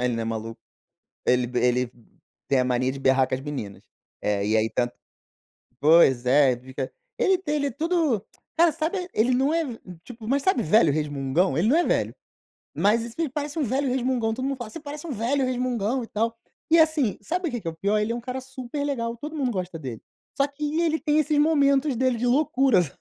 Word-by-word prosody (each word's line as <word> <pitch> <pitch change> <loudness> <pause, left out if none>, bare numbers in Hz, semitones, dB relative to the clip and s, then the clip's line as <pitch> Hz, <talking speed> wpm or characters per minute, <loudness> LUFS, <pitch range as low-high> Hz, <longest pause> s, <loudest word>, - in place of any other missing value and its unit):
Ele 125 -1 +1
não 115 - -2
é - - -3
maluco. 115 0 -5 0.7
Ele 125 -1 +2
ele 125 0 +1 0.6
tem 135 - +3
a - - +3
mania 125 +1 +1
de 135 - -7
berrar 130 -1 +3
com 130 - -1
as 130 - -7
meninas. 135 -9 -6 0.4
É, 100 -1 0
e 110 +1 +2
aí 110 +1 +1
tanto 120 0 -1 0.9
pois 145 -5 +5
é, 135 0 +5
ele 120 - -5
fica 130 +1 -6 0.3
ele 380 -1 +3
tem 300 -5 -2
ele 285 -1 0
é 280 - -1
tudo 310 - 0 0.3
cara, 335 -1 +5
sabe, 335 +4 -2
ele 225 +4 +2
não 270 +4 +2
é 330 0 +2 0.4
tipo, 225 -1 -11
mas 275 +3 +1
sabe, 330 -9 +2
velho 170 -1 +4
resmungão? 145 +2 0
Ele 190 +6 +2
não 290 - +4
é 350 - +3
velho, - - 0 0.6
mas 215 +3 +3
isso 235 0 -8
ele 330 -2 0
parece 290 +3 -4
um 305 - +1
velho 270 +3 0
resmungão. 250 -3 0
Todo 255 +3 -4
mundo 275 0 -1
fala: 240 -4 -7
"Você - - -8
parece 295 +2 -8
um 320 - -6
velho 255 +4 0
resmungão 250 -1 -1
e - - -9
tal". 225 +1 -2 0.3
E 330 - +6
assim, 315 -8 +3
sabe 350 - -2
o - - -4
que 240 - -3
que - - -14
é - - 0
o - - -11
pior? 200 +5 +1
Ele 210 +2 0
é - - -2
um 240 - -4
cara 255 +2 -5
super 260 +2 -6
legal, 235 -5 -2
todo 300 +6 -7
mundo 275 -5 0
gosta 185 -5 -4
dele. 130 -7 -7 0.4
Só 275 - +3
que 295 +2 -3
ele 320 -2 +1
tem 300 -1 +1
esses 305 0 +1
momentos 285 -3 +3
dele 255 0 +1
de 245 +2 -1
loucuras. 265 - +3
240 Hz, 225 wpm, -25 LUFS, -, 0.9 s, E